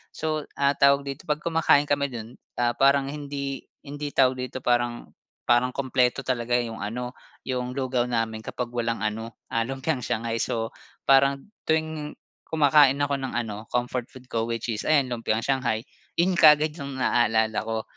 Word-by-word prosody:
So, 155 Hz, -1 st, -2 dB
ah, 140 Hz, 0 st, +3 dB
tawag 140 Hz, 0 st, +5 dB
dito, 135 Hz, -, -7 dB
'pag 150 Hz, 0 st, 0 dB
kumakain 165 Hz, -3 st, +4 dB
kami 140 Hz, -1 st, +2 dB
dun, 115 Hz, +1 st, -8 dB, 0.2 s
ah, 120 Hz, 0 st, +3 dB
parang 140 Hz, 0 st, +4 dB
hindi 140 Hz, -2 st, -5 dB, 0.2 s
hindi 145 Hz, 0 st, -6 dB
tawag 130 Hz, -1 st, +4 dB
dito, 130 Hz, 0 st, -5 dB
parang 120 Hz, -1 st, 0 dB, 0.3 s
parang 125 Hz, +1 st, +2 dB
kumpleto 130 Hz, -1 st, +1 dB
talaga 120 Hz, -1 st, 0 dB
'yung 115 Hz, -2 st, -1 dB
ano, 125 Hz, +5 st, -4 dB, 0.3 s
'yung 125 Hz, -1 st, -3 dB
lugaw 130 Hz, -2 st, 0 dB
namin 115 Hz, -2 st, -1 dB
kapag 120 Hz, +2 st, -5 dB
walang 115 Hz, -1 st, -2 dB
ano, 110 Hz, +2 st, -3 dB, 0.2 s
ah, 115 Hz, 0 st, 0 dB
lumpiang 135 Hz, +2 st, -2 dB
shanghai. 115 Hz, -1 st, -2 dB
So 115 Hz, 0 st, -1 dB, 0.3 s
parang 140 Hz, +5 st, +3 dB, 0.2 s
tuwing 160 Hz, -1 st, -1 dB, 0.3 s
kumakain 145 Hz, -3 st, +5 dB
ako 140 Hz, -1 st, 0 dB
ng 135 Hz, -1 st, -4 dB
ano, 110 Hz, -2 st, -4 dB
comfort 125 Hz, 0 st, -2 dB
food 130 Hz, -3 st, -16 dB
ko 115 Hz, 0 st, 0 dB
which 115 Hz, 0 st, -3 dB
is 110 Hz, -, -4 dB
ayan 140 Hz, -5 st, +3 dB
lumpiang 115 Hz, -1 st, -1 dB
shanghai, 125 Hz, -5 st, 0 dB, 0.3 s
'yun 180 Hz, +2 st, +2 dB
kaagad 155 Hz, 0 st, +7 dB
'yung 140 Hz, -1 st, -5 dB
naaalala 110 Hz, -3 st, +2 dB
ko. 110 Hz, 0 st, -3 dB
125 Hz, 165 wpm, -25 LUFS, 115-140 Hz, 0.3 s, kaagad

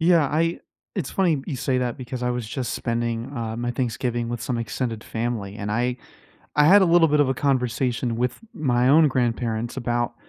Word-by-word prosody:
yeah 165 Hz, -2 st, +4 dB
I 165 Hz, +4 st, 0 dB, 0.3 s
it's 180 Hz, -9 st, -3 dB
funny 170 Hz, -7 st, +2 dB
you 155 Hz, -, -3 dB
say 130 Hz, 0 st, 0 dB
that 125 Hz, -1 st, -1 dB
because 125 Hz, -1 st, -6 dB
I 125 Hz, -, +1 dB
was 120 Hz, -3 st, -3 dB
just 125 Hz, +1 st, -3 dB
spending, 115 Hz, +1 st, -2 dB
uh, 115 Hz, -1 st, -3 dB
my 120 Hz, 0 st, -2 dB
Thanksgiving 120 Hz, -1 st, -2 dB
with 120 Hz, -1 st, -4 dB
some 120 Hz, 0 st, -2 dB
extended 115 Hz, 0 st, -3 dB
family, 110 Hz, -3 st, -3 dB
and 105 Hz, 0 st, -4 dB
I 120 Hz, +3 st, 0 dB, 0.6 s
I 150 Hz, 0 st, +5 dB
had 195 Hz, +5 st, +7 dB
a -, -, +5 dB
little 170 Hz, -1 st, +5 dB
bit 150 Hz, 0 st, +2 dB
of 145 Hz, -3 st, +4 dB
a -, -, +2 dB
conversation 125 Hz, -3 st, 0 dB
with 125 Hz, +1 st, -1 dB
my 125 Hz, -4 st, +2 dB
own 155 Hz, +2 st, +6 dB
grandparents 120 Hz, -2 st, -1 dB
about 120 Hz, -1 st, -1 dB
125 Hz, 200 wpm, -24 LUFS, 115-140 Hz, 0.6 s, had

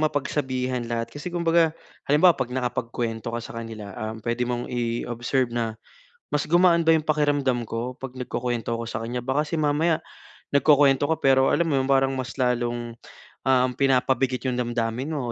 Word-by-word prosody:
mapagsabihan 130 Hz, -4 st, -1 dB
lahat 115 Hz, -1 st, -2 dB
kasi 145 Hz, +5 st, -6 dB
kumbaga 170 Hz, -2 st, +3 dB, 0.3 s
halimbawa 160 Hz, +5 st, +5 dB
'pag 125 Hz, -2 st, -3 dB
nakapagkuwento 120 Hz, -2 st, -3 dB
ka 120 Hz, -, -2 dB
sa 115 Hz, -, -9 dB
kanila, 110 Hz, -3 st, -8 dB
um, 110 Hz, +1 st, -5 dB
pwede 120 Hz, +1 st, 0 dB
mong 120 Hz, 0 st, -2 dB
i-observe 120 Hz, +1 st, -1 dB
na, 115 Hz, -2 st, -1 dB, 0.6 s
"Mas 150 Hz, -, +1 dB
gumaan 175 Hz, 0 st, +5 dB
ba 165 Hz, -, +6 dB
'yong 155 Hz, -1 st, +1 dB
pakiramdam 145 Hz, -5 st, +1 dB
ko 120 Hz, +3 st, -4 dB
pag 135 Hz, -2 st, -7 dB
nagkukuwento 120 Hz, -2 st, -3 dB
ko 115 Hz, -, -4 dB
sa 110 Hz, 0 st, -4 dB
kanya?" 120 Hz, +1 st, -4 dB
Baka 135 Hz, +3 st, +1 dB
kasi 165 Hz, +2 st, -3 dB
mamaya 155 Hz, +2 st, +2 dB, 0.6 s
nagkukuwento 140 Hz, -1 st, +5 dB
ko 160 Hz, -, +3 dB
pero 135 Hz, -2 st, +4 dB
alam 170 Hz, -, +2 dB
mo 145 Hz, -, +1 dB
yung 130 Hz, -, -1 dB
parang 135 Hz, 0 st, +3 dB
mas 130 Hz, 0 st, -4 dB
lalong, 120 Hz, -1 st, 0 dB, 0.5 s
um, 130 Hz, -1 st, +4 dB
pinapabigat 130 Hz, -1 st, +1 dB
'yong 125 Hz, -, -1 dB
damdamin 120 Hz, +3 st, -2 dB
mo 135 Hz, -5 st, -3 dB
130 Hz, 170 wpm, -25 LUFS, 120-145 Hz, 0.6 s, ba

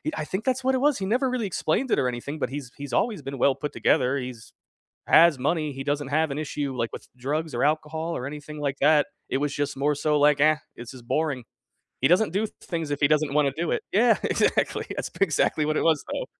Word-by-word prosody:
I -, -, -3 dB
think 190 Hz, +7 st, -4 dB
that's 260 Hz, 0 st, 0 dB
what 265 Hz, +1 st, +2 dB
it -, -, +2 dB
was, 290 Hz, -2 st, +2 dB
he 190 Hz, -, -2 dB
never 250 Hz, +6 st, +1 dB
really 250 Hz, -4 st, -1 dB
explained 195 Hz, +7 st, -1 dB
it -, -, +3 dB
or 130 Hz, -, +1 dB
anything, 125 Hz, +5 st, -5 dB
but -, -, -1 dB
he's 135 Hz, -2 st, -6 dB
he's 140 Hz, -2 st, -7 dB
always 220 Hz, -8 st, 0 dB
been 135 Hz, 0 st, -6 dB
well 135 Hz, +2 st, +3 dB
put 150 Hz, -, -5 dB
together. 130 Hz, +2 st, +2 dB
He's 125 Hz, -4 st, -7 dB, 0.5 s
has 165 Hz, -3 st, +6 dB
money. 150 Hz, +3 st, 0 dB
He 135 Hz, 0 st, -6 dB
doesn't 145 Hz, -1 st, -1 dB
have 155 Hz, +1 st, +1 dB
an 140 Hz, -, -4 dB
issue, 145 Hz, -2 st, -3 dB
like, 115 Hz, -2 st, -2 dB
with -, -, -9 dB
drugs 150 Hz, +4 st, -3 dB
or 120 Hz, -, -1 dB
alcohol 160 Hz, +2 st, -1 dB
or 125 Hz, -, -4 dB
anything 150 Hz, +1 st, -8 dB
like 140 Hz, -1 st, -2 dB
that. 150 Hz, 0 st, +5 dB, 0.2 s
It -, -, -1 dB
was 145 Hz, 0 st, -1 dB
just 145 Hz, -1 st, -2 dB
more 145 Hz, +2 st, +1 dB
so, 150 Hz, +1 st, +1 dB
like, 145 Hz, -1 st, +4 dB
"Ah, 155 Hz, +1 st, +4 dB, 0.2 s
this 120 Hz, 0 st, -9 dB
is 130 Hz, -, -10 dB
boring." 140 Hz, 0 st, -1 dB, 0.6 s
He 135 Hz, -, +5 dB
doesn't 180 Hz, +6 st, +3 dB
do 210 Hz, +3 st, 0 dB, 0.2 s
things 165 Hz, -4 st, -4 dB
if 145 Hz, -1 st, -2 dB
he 140 Hz, -, +5 dB
doesn't 150 Hz, -1 st, +2 dB
wanna 145 Hz, -2 st, +3 dB
do 165 Hz, +1 st, -2 dB
it. -, -, -1 dB
Yeah. 230 Hz, +4 st, +4 dB
Exactly. -, -, +1 dB
That's -, -, -4 dB
p -, -, -15 dB
exactly 155 Hz, -3 st, +1 dB
what 155 Hz, 0 st, 0 dB
it -, -, +1 dB
was, 160 Hz, -2 st, +2 dB
though. -, -, -3 dB
150 Hz, 245 wpm, -25 LUFS, 140-165 Hz, 0.6 s, has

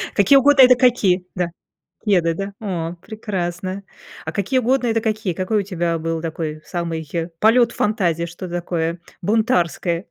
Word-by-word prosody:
какие 210 Hz, +7 st, +6 dB
угодно- 280 Hz, 0 st, +6 dB
это 250 Hz, 0 st, +7 dB
какие? 205 Hz, -8 st, +2 dB
Да? 180 Hz, -1 st, -1 dB, 0.6 s
Кеды, 175 Hz, -5 st, +2 dB
да? 195 Hz, +2 st, -5 dB
О, 175 Hz, -5 st, -3 dB
прекрасно. 190 Hz, -3 st, -4 dB, 0.4 s
А -, -, -4 dB
какие 235 Hz, +6 st, 0 dB
угодно- 250 Hz, +1 st, +1 dB
это 225 Hz, 0 st, +1 dB
какие? 215 Hz, -5 st, -1 dB
Какой 190 Hz, +4 st, 0 dB
у -, -, +1 dB
тебя 170 Hz, -3 st, -2 dB
был 165 Hz, 0 st, -3 dB
такой 155 Hz, -1 st, -4 dB
самый 165 Hz, -3 st, -4 dB, 0.3 s
полёт 235 Hz, +2 st, +4 dB
фантазии, 175 Hz, -6 st, 0 dB
что-то 175 Hz, +1 st, -8 dB
такое 170 Hz, -1 st, -2 dB, 0.2 s
бунтарское? 180 Hz, -5 st, 0 dB
185 Hz, 150 wpm, -20 LUFS, 170-220 Hz, 0.6 s, это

